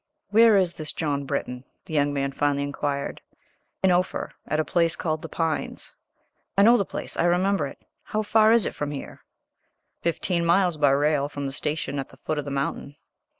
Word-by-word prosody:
"Where 225 0 +6
is 180 -3 +2
this 155 -1 -5
John 140 -3 -2
Britton?" 125 -2 -3 0.2
the - - -9
young 145 -1 +2
man 140 -1 -1
finally 140 0 0
inquired. 140 0 -3 0.6
"In 190 - +5
Ophir 180 +1 0 0.2
at 155 - 0
a 155 - +1
place 170 -2 +2
called 155 -1 -2
The - - -7
Pines." 165 -1 -3 0.6
"I 200 - +6
know 235 +3 +7
the 205 - +2
place; - - -5
I 165 - +2
remember 180 -2 +2
it. - - -11 0.3
How 215 0 -1
far 220 +1 +4
is 230 -3 +5
it - - -2
from 145 - -3
here?" 145 -2 -7 0.8
"Fifteen 170 +1 0
miles 170 0 +3
by 145 -2 +4
rail 145 +1 +2
from 145 -1 -5
the 135 - -3
station 145 0 -3
at 135 - -5
the 130 - -17
foot 155 +2 -3
of 145 - -4
the - - -4
mountain." 140 +1 -3
155 Hz, 195 wpm, -25 LUFS, 140-180 Hz, 0.8 s, know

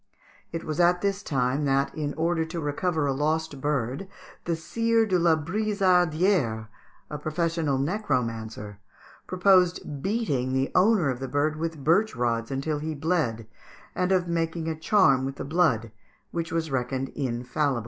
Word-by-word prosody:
It 165 - -4
was 155 +1 -4
at 175 0 +4
this 200 0 0
time 135 -3 0
that, 140 0 +1
in 145 -2 -3
order 165 0 +1
to 165 +1 -5
recover 155 +1 -1
a 140 - +1
lost 155 0 -1
bird, 140 +3 -1 0.4
the 170 - 0
Sire 230 +7 +1
de 185 -4 +1
la 170 -1 +4
Brizardière, 180 - +1 0.4
a 150 - -4
professional 155 -2 -1
necromancer, 115 - -2 0.5
proposed 180 -6 +2
beating 145 - -1
the 130 +1 0
owner 185 -6 +4
of 125 - -5
the 135 - -4
bird 145 +3 0
with 160 -2 -4
birch 175 +5 +3
rods 115 -1 -1
until 140 +3 -2
he 155 +1 -4
bled, 145 -8 -1 0.5
and 180 +1 0
of 180 -2 +2
making 165 -1 -1
a 160 - -1
charm 155 -5 +3
with 135 +1 -3
the - - -6
blood, 140 -9 +1 0.4
which 170 -1 -3
was 165 -2 -2
reckoned 130 +1 -2
infallible. 130 +1 -1
155 Hz, 155 wpm, -26 LUFS, 135-175 Hz, 0.5 s, at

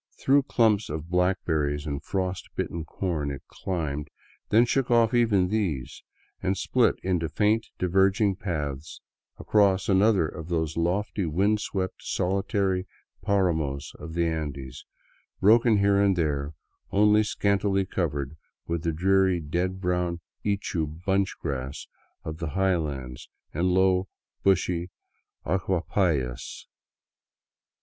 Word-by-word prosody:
Through 140 +2 +4
clumps 110 -3 +3
of 80 +3 -5
black 90 +1 +1
berries 75 -2 0
and 70 -2 -3
frost 95 0 -3
bitten 85 -2 -3
corn 80 -4 -2
it 70 0 -6
climbed, 75 -5 -3 0.4
then 115 +3 +5
shook 130 +2 0
off 115 -1 +4
even 105 -7 +3
these, 80 -11 -2 0.4
and 95 +1 0
split 120 +5 +2
into 90 -4 0
faint, 110 +5 +1
diverging 95 +2 +2
paths 75 -6 -4 0.4
across 100 -3 +2
another 95 -3 +4
of 80 +1 -8
those 80 -2 -1
lofty, 95 +3 -1
wind 100 +7 +2
swept, 95 -3 -3
solitary 95 0 0 0.3
paramos 80 -8 0
of 80 +2 -8
the 85 0 +2
Andes, 70 -5 -4 0.5
broken 110 +2 +5
here 100 0 +3
and 100 -2 +3
there, 75 -3 -1 0.3
only 105 +2 +4
scantily 100 -2 +1
covered 75 -6 -2 0.3
with 85 -1 -2
the 85 0 0
dreary 95 +2 +2
dead 90 +4 -2
brown 90 -2 -1 0.2
ichu 100 -6 -1 0.2
bunch 95 0 +1
grass 70 -2 -4 0.4
of 80 0 -6
the 80 - -3
highlands, 75 -10 -1 0.2
and 85 +4 +1
low, 95 0 +3 0.3
bushy 90 -2 +1 0.6
achupallas. 85 -8 -1
90 Hz, 120 wpm, -26 LUFS, 80-100 Hz, 0.6 s, then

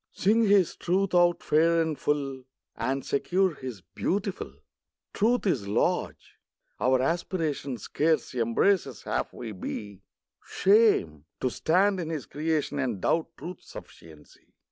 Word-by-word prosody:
Sing 220 +4 +2
His 200 -4 +3
Truth 185 +2 0
out 175 -1 +3
fair 165 +2 +3
and 160 -2 0
full, 135 -3 -2 0.3
And 135 +3 -2
secure 185 +5 +1
His 130 -8 -8
beautiful. 185 - -3 0.6
Truth 235 +4 +1
is 130 - 0
large. 100 - -1 0.4
Our 130 0 +3
aspiration 155 -4 -2
Scarce 155 +8 0
embraces 130 - +1
half - - -2
we 115 -3 -7
be. 100 0 -7 0.4
Shame! 195 - +3
to 130 - 0
stand 190 +7 +2
in 165 -2 -4
His 155 -7 -4
creation 150 +1 -2
And 125 -7 -1
doubt 160 - +1
Truth's 170 +4 -9
sufficiency! 80 -2 -14
155 Hz, 125 wpm, -27 LUFS, 125-185 Hz, 0.6 s, His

